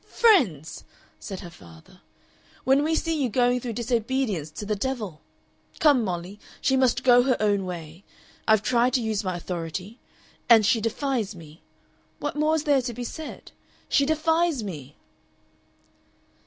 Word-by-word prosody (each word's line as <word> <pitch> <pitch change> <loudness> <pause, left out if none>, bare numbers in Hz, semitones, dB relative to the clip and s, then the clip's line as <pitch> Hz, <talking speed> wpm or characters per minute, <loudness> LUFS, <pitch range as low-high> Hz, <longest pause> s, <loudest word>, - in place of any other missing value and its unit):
"Friends!" 215 - +2 0.4
said 190 -2 -7
her 175 - -10
father. 85 - -17 0.6
"When 270 +2 +4
we 320 +1 +1
see 320 -2 -1
you 255 - +1
going 245 +2 +2
through 240 -1 -5
disobedience 235 - -1
to 205 - -8
the 210 +1 -1
devil! 210 -8 -4 0.6
Come, 285 -6 +4
Molly, 180 +1 -5 0.2
she 265 - +2
must 260 -3 +2
go 245 -1 +6
her 255 0 +1
own 205 -2 +1
way. 170 0 -8 0.4
I've 220 -2 +4
tried 240 +2 +2
to 255 - +2
use 220 -1 -1
my 185 -2 -2
authority. 180 +5 -6 0.5
And 225 -3 +7
she 225 +1 +3
defies 230 -2 -2
me. 160 -1 -14 0.6
What 295 - -4
more 305 +1 +2
is 310 - -1
there 285 -3 +3
to 240 -1 -4
be 245 - -5
said? 315 +6 -8 0.4
She 280 -1 +3
defies 320 -3 +1
me!" 150 -8 -8
230 Hz, 155 wpm, -25 LUFS, 185-265 Hz, 0.6 s, And